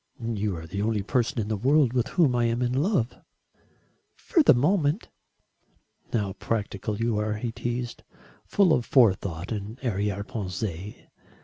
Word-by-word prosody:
"You 105 -3 -1
are 80 - -8
the 100 +5 -4
only 105 -1 0
person 125 +5 0
in 105 - -1
the 110 - -1
world 130 +3 +3
with 125 0 +1
whom 150 -8 +2
I 120 -1 +2
am 115 +2 0
in 120 0 0
love." 135 - +1 1.0
"For 340 - +2
the 290 - +6
moment." 155 - +1 1.0
"How 105 -5 -1
practical 105 -1 -3
you 115 -1 0
are!" 105 0 -1
he 115 +2 -3
teased, 120 +1 -4 0.4
"full 190 -5 +3
of 125 - +2
forethought 95 - +2
and 105 +1 -4
arrière 100 -4 -1
pensées. 100 -3 -4
115 Hz, 150 wpm, -26 LUFS, 100-125 Hz, 1.0 s, the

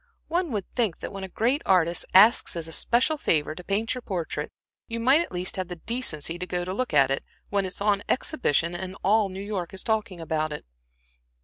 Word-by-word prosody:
One 345 -1 0
would 205 -5 -2
think 225 -9 0
that - - -6
when 195 -1 -6
a - - -4
great 245 +10 +1
artist 175 -2 +2
asks 210 +2 +6
as 165 -1 -4
a - - -9
special 250 - +2
favor 155 - +1
to 180 - -10
paint 205 +5 0
your 250 - -5
portrait, 180 -8 -3 0.4
you 230 -1 -4
might 265 +7 +5
at - - -5
least 180 +1 -3
have 185 -1 -2
the 180 - -6
decency 170 - -2
to 180 - -4
go 180 -1 -2
to 185 - -3
look 255 +5 -2
at 140 -3 +4
it, 135 - 0 0.3
when 200 -1 +1
it 185 - -5
is - - -5
on 200 -1 +2
exhibition, 175 - +1
and 185 +2 -5
all 210 0 +3
New 190 0 -7
York 195 -4 -4
is 190 - -10
talking 220 -5 -1
about 155 -1 -1
it." 150 - -6
190 Hz, 225 wpm, -26 LUFS, 170-225 Hz, 0.4 s, asks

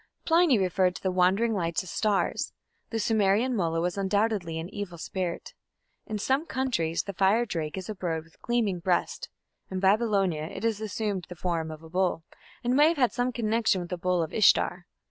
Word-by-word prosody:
Pliny 330 -6 +4
referred 185 -1 +1
to - - -9
the 190 - +1
wandering 190 +6 +3
lights 170 -2 -1
as 185 - -8
stars. 210 -3 0 0.4
The 225 - -2
Sumerian 220 +3 +2
"mulla" 165 -5 0
was 180 +3 -1
undoubtedly 195 -4 0
an 160 +1 -4
evil 200 -4 -5
spirit. 175 +1 -4 0.5
In 215 - -3
some 265 +9 0
countries 230 -12 -1
the 200 - -6
"fire 200 +6 +3
drake" 160 -6 -4
is 185 - -5
a 215 - -3
bird 170 -5 -3
with 165 0 -25
gleaming 225 -7 0
breast: 175 +1 -1 0.4
in 190 - -3
Babylonia 195 -5 +2
it 185 - -6
assumed 210 -3 -2
the 180 - -7
form 165 -2 -2
of 155 0 -9
a 160 - -12
bull, 180 -2 0 0.4
and 245 +1 +1
may 295 +2 +6
have 330 0 +1
had 250 -4 +2
some 245 +1 0
connection 225 -4 +1
with 175 0 -7
the - - 0
bull 180 -1 +1
of 160 - -5
lshtar. 190 -3 +3
195 Hz, 190 wpm, -27 LUFS, 175-225 Hz, 0.5 s, may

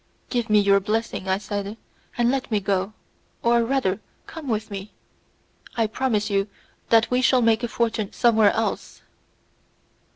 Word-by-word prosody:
"Give 240 -3 -1
me 210 0 +5
your 200 -1 +4
blessing," 215 -1 -2
I 190 - +2 0.2
added, 205 +1 -3 0.4
"and 240 0 +3
let 270 -1 -2
me 215 -3 +1
go; 195 +1 -1 0.5
or, 235 0 +4
rather, 230 -6 0 0.3
come 325 -4 -9
with 220 -3 -2
me. 195 +1 -7 0.8
I 225 - +3
promise 220 -1 -1
you 200 -1 0 0.4
that 230 +1 +4
we 250 0 +2
shall 255 -1 +4
make 225 0 +3
a 240 - -1
fortune 225 -3 -1
somewhere 220 -3 +4
else." 225 -1 -3
220 Hz, 155 wpm, -23 LUFS, 205-235 Hz, 0.8 s, me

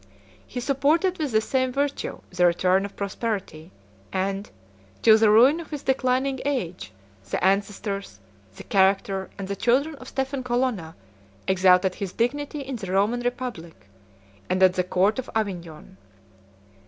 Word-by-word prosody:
He 250 - -5
supported 295 +8 +1
with 300 -4 -1
the 220 0 +3
same 260 +2 0
virtue 280 +2 -2
the 180 0 +3
return 185 +3 +2
of 200 - -9
prosperity; 200 -5 -4 0.4
and, 195 +1 -2 0.5
till 220 - +8
the 220 -1 +5
ruin 250 +9 +6
of 335 - -9
his 295 -3 -6
declining 265 0 +1
age, 245 -12 -3 0.4
the - - -2
ancestors, 195 - -1 0.4
the - - -10
character, 195 0 +1
and 195 -1 -5
the 200 - -3
children 260 +9 +1
of 255 - -12
Stephen 270 0 -3
Colonna, 240 -10 -1 0.5
exalted 185 0 +4
his 195 -2 -5
dignity 290 +5 -1
in 270 -2 -5
the 190 -5 -6
Roman 205 +5 +2
republic, 240 - -5 0.6
and 185 +1 +2
at 185 -1 +6
the 185 - 0
court 190 +6 +1
of 260 - -6
Avignon. 175 - -4
215 Hz, 145 wpm, -25 LUFS, 190-260 Hz, 0.6 s, till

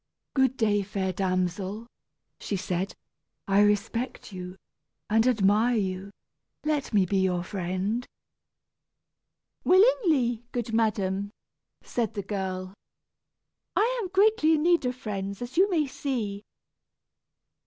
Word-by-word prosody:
"Good 265 -2 +2
day, 210 -3 +2
fair 190 -1 -2
damsel," 185 +3 -1 0.5
she 205 - -3
said. 185 +1 -2 0.5
"I 195 +1 +4
respect 215 +3 0
you 180 0 -7 0.5
and 225 +2 +4
admire 220 +1 +3
you 190 -2 -2 0.6
let 300 -2 0
me 200 -4 +4
be 195 +2 0
your 180 -2 +1
friend." 190 +5 -2 1.6
"Willingly, 355 - +4
good 235 -2 -3
madam," 205 -3 0 0.5
said 230 -4 -2
the 200 - -3
girl. 190 -2 -4 1.0
"I - - +2
am 390 - -3
greatly 390 -4 +4
in 300 - 0
need 340 -6 +3
of 250 - -2
friends, 200 -5 -4
as 245 +1 -7
you 380 +4 +5
may 325 -5 +2
see." 235 -8 -3
210 Hz, 115 wpm, -27 LUFS, 190-260 Hz, 1.6 s, you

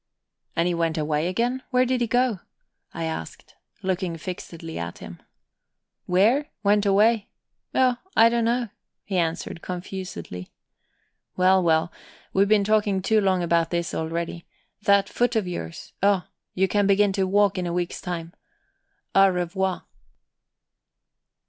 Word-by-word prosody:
"And 170 +1 +2
he 175 - +1
went 165 -1 0
away 150 +1 0
again? 240 +7 -1
Where 255 -1 +3
did 255 0 0
he 240 - +1
go?" 245 -3 +1 0.5
I 165 - -5
asked, 160 - -6 0.3
looking 185 -2 -1
fixedly 165 - -7
at 85 0 -5
him. 85 - -10 0.9
"Where? 220 +11 +3 0.2
Went 205 0 +3
away? 210 +2 +3 0.5
Oh, 255 -2 +3 0.2
I 225 - +7
don't 235 -1 +1
know," 235 0 0 0.3
he 190 -3 -1
answered 165 0 -2
confusedly. 180 - -6 0.9
"Well, 185 +1 +5
well, 165 -1 +2 0.4
we've 195 +1 +4
been 210 -1 +4
talking 205 -2 +1
too 215 +2 +3
long 190 -2 +2
about 170 -1 +2
this 170 -1 -2
already. 170 +1 -3 0.3
That 200 -2 +4
foot 245 0 0
of 215 -4 +1
yours 85 - -6
oh, 200 -2 +3 0.3
you 190 +1 +3
can 205 +1 +2
begin 200 0 +3
to 190 -1 0
walk 200 0 +3
in 180 - -2
a 170 - -2
week's 175 -1 -2
time. 170 -1 -5 0.8
_Au 195 0 +6
revoir. 185 +1 -1
190 Hz, 140 wpm, -24 LUFS, 170-210 Hz, 0.9 s, I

